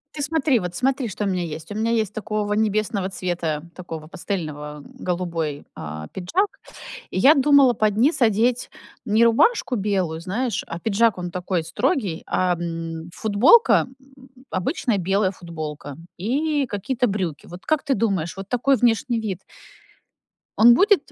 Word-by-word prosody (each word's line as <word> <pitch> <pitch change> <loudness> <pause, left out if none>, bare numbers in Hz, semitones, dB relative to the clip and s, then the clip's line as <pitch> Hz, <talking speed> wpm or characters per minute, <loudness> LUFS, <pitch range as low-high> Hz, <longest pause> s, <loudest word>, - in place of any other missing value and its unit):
Ты 290 - -3
смотри, 290 -4 +2
вот 180 -2 -5
смотри, 265 +1 0
что 210 0 -4
у - - 0
меня 185 -2 -1
есть. 160 +2 -7
У - - -5
меня 225 +2 0
есть 220 -4 0
такого 210 -1 -2
небесного 210 -2 0
цвета, 170 -4 -3
такого 165 -4 -8
пастельного, 155 -4 -5
м, 145 - -14
голубой, 170 -5 -3
а, 75 0 -7
пиджак. 340 - -1 0.6
И - - -1
я 280 +10 +7
думала 275 -2 +5
под 215 -2 +1
низ 275 +5 +2
одеть 235 +2 +2 0.4
не 220 0 +3
рубашку 255 - +3
белую, 190 -6 -1
знаешь, 215 +8 -2
а 165 - -6
пиджак, 220 +1 +2
он 175 0 -4
такой 180 -1 -2
строгий, 195 - -1
а, 180 -1 +1
м, 165 -1 -5
футболка, 240 - +4
м, 270 0 -23 0.3
обычная 230 - -1
белая 190 +1 +1
футболка 155 -6 -7 0.2
и 285 - 0
какие-то 245 +3 -1
брюки. 185 -8 -3
Вот 175 +1 -11
как 310 -2 +1
ты 285 -2 +1
думаешь, 195 -9 -1
вот 195 0 -8
такой 260 +2 +2
внешний 240 0 +1
вид 200 -5 -4 1.2
он 235 +2 +8
будет 390 - +3
205 Hz, 155 wpm, -22 LUFS, 175-245 Hz, 1.2 s, он